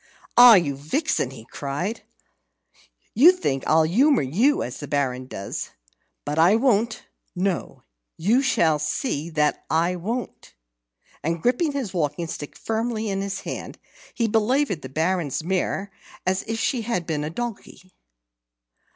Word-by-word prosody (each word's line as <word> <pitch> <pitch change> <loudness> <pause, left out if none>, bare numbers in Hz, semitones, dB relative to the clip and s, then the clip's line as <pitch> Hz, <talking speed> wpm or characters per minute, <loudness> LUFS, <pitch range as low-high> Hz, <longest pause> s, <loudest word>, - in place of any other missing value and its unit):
"Ah, 245 -2 +10
you 155 -7 +2
vixen!" 155 - -1
he 125 -4 -12
cried. 145 - -4 1.1
"You 300 +10 +8
think 135 - -2
I'll 160 +1 +5
humour 250 - +3
you 220 - +2
as 125 - -6
the 145 - -6
Baron 130 -3 -1
does. 100 -5 -5 0.6
But 150 +2 -2
I 175 +6 +6
won't 230 -2 +1 0.3
no, 185 0 -2 0.3
you 220 +10 +3
shall 165 - +2
see 155 - -2
that 150 -2 0
I 170 +3 +1
won't!" 230 +8 -5 0.7
And 165 +2 -1
gripping 260 - +1
his 255 -9 -3
walking 160 -1 -1
stick 150 -2 -7
firmly 225 -1 -2
in 195 0 -2
his 200 0 -4
hand, - - -6 0.4
he 230 -3 +1
belaboured 225 - +1
the 130 - -8
Baron's 160 0 -1
mare 190 +2 -1 0.3
as 185 +1 +1
if 225 0 -2
she 250 +1 0
had 220 -6 -2
been 155 -3 -2
a 150 - -3
donkey. 195 -2 -7
185 Hz, 140 wpm, -24 LUFS, 155-230 Hz, 1.1 s, Ah